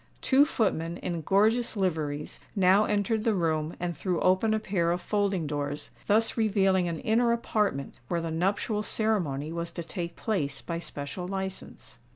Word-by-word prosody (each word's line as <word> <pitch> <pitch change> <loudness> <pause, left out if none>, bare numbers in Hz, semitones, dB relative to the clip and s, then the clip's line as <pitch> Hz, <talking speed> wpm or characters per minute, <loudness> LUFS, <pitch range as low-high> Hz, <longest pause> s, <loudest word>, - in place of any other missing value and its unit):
Two 275 +2 +5
footmen, 175 - 0
in 170 -2 -3
gorgeous 220 +7 +2
liveries, 155 -6 -2 0.2
now 195 +2 +5
entered 210 +1 0
the 225 -2 +2
room 160 -3 0
and 175 -1 -2
threw 180 -3 -1
open 185 +4 +3
a 220 - +2
pair 190 -5 0
of 175 +1 +1
folding 200 -3 0
doors, 145 0 -3 0.2
thus 220 +2 +3
revealing 195 -5 +2
an 165 -1 -2
inner 235 +2 +3
apartment 210 -11 0
where 170 - 0
the 165 -1 -3
nuptial 195 +5 0
ceremony 175 -10 -1
was 170 0 -3
to 170 - -4
take 170 0 -5
place 145 -11 -1
by 170 -1 -4
special 160 +3 -6
license. 190 0 -6
185 Hz, 165 wpm, -28 LUFS, 165-210 Hz, 0.2 s, Two